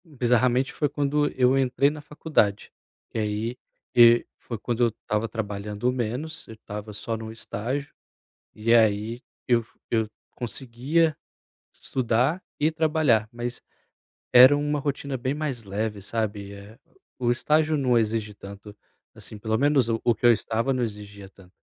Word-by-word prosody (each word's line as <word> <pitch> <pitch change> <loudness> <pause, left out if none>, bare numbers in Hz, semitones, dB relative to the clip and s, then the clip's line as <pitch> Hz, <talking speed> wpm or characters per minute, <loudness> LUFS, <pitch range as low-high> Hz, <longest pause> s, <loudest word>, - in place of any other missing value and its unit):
Hum, 155 -3 -18
bizarramente, 125 +2 +2
foi 145 - 0
quando 145 0 +1
eu 130 +1 +3
entrei 135 +1 +3
na 150 0 -7
faculdade. 145 -9 0 0.4
E - - -2
aí, 110 +3 -2 0.4
e 120 0 +7
foi 115 - -6
quando 120 +3 -1
eu - - +5
estava 110 0 -3
trabalhando 105 +2 -3
menos. 125 +6 -4
Eu 110 - -10
estava 105 0 -8
só 115 +2 -4
num 110 0 -7
estágio. 125 +5 -4 0.6
E 115 +2 +1
aí, 110 +1 +3 0.3
eu 120 -2 +3 0.3
eu 110 -2 +1 0.3
conseguia 135 +6 -1 0.6
estudar 130 +7 0 0.2
e 155 +2 +2
trabalhar, 155 -9 +2
mas 120 +1 -5 0.7
era 130 +4 +9
uma 145 0 -1
rotina 140 -1 -3
bem 130 +2 -2
mais 145 -6 -3
leve, 105 +1 -3
sabe? 105 -1 -3
Eh, 100 +3 -12 0.4
o 125 - -1
o - - +5
estágio 155 +5 +2
não 125 -4 +2
exige 110 -1 -1
tanto. 100 +1 -11 0.4
Assim, 110 - -9
pelo 110 +1 -1
menos 140 -2 +3
o 115 -1 0
o 120 - +3
que - - -3
eu 120 - +9
estava 115 +3 0
não 125 -1 0
exigia 100 -3 -7
tanto. 95 -1 -19
120 Hz, 155 wpm, -25 LUFS, 110-135 Hz, 0.7 s, era